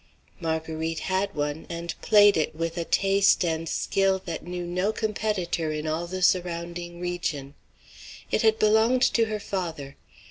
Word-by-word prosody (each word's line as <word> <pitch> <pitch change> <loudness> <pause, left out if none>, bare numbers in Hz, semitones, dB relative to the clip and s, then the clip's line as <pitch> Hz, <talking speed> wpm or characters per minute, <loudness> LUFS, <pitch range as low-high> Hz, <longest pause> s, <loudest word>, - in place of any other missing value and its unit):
Marguerite 160 0 -2
had 190 +1 -1
one, 145 +1 -3
and 170 0 -4
played 205 -1 +6
it 155 -1 0
with 165 +1 -3
a 170 -2 -2
taste 195 0 +3
and 165 -1 -2
skill 195 -1 +1
that 165 -2 -5
knew 180 0 -5
no 180 +4 0
competitor 210 -7 -2
in 155 0 -4
all 160 +2 -2
the 185 +1 -4
surrounding 175 -1 0
region. 165 -6 -3 0.8
It - - +2
had 220 -1 +4
belonged 220 +4 +3
to 230 - +3
her 215 -1 -3
father. 165 -9 -5
175 Hz, 150 wpm, -26 LUFS, 160-195 Hz, 0.8 s, played